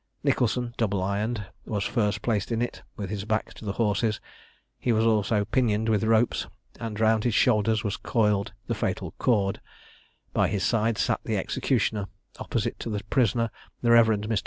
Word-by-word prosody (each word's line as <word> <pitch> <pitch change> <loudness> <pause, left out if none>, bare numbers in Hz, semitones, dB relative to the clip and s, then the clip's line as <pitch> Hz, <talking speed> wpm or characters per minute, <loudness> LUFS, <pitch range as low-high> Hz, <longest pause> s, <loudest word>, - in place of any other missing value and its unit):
Nicholson, 120 0 +1
double 100 -4 0
ironed, 105 +3 -1 0.2
was 105 -3 -1
first 105 -4 0
placed 110 -2 0
in 115 - 0
it, 120 - -3 0.2
with 100 -2 -4
his 100 -2 -3
back 110 +1 -1
to - - -13
the 100 -2 -2
horses; 110 0 +1 0.6
he 120 - 0
was 110 0 +3
also 105 -1 +2
pinioned 110 -1 +1
with 110 -1 +2
ropes, 110 +1 +2 0.3
and 110 -2 -5
round 110 -1 +3
his 120 -3 +1
shoulders 110 -2 +3
was 105 -2 -2
coiled 105 -4 +1
the - - -1
fatal - - -2
cord; 100 -5 +1 0.7
by - - +3
his 100 -3 -1
side 115 +1 +1
sat - - +1
the - - -1
executioner; 105 -3 0 0.3
opposite - - -2
to - - -4
the 105 -1 -3
prisoner 115 -2 +2 0.3
the 120 - +4
Rev. 115 -1 +7
Mr. 110 0 +1
110 Hz, 175 wpm, -26 LUFS, 105-115 Hz, 0.7 s, Rev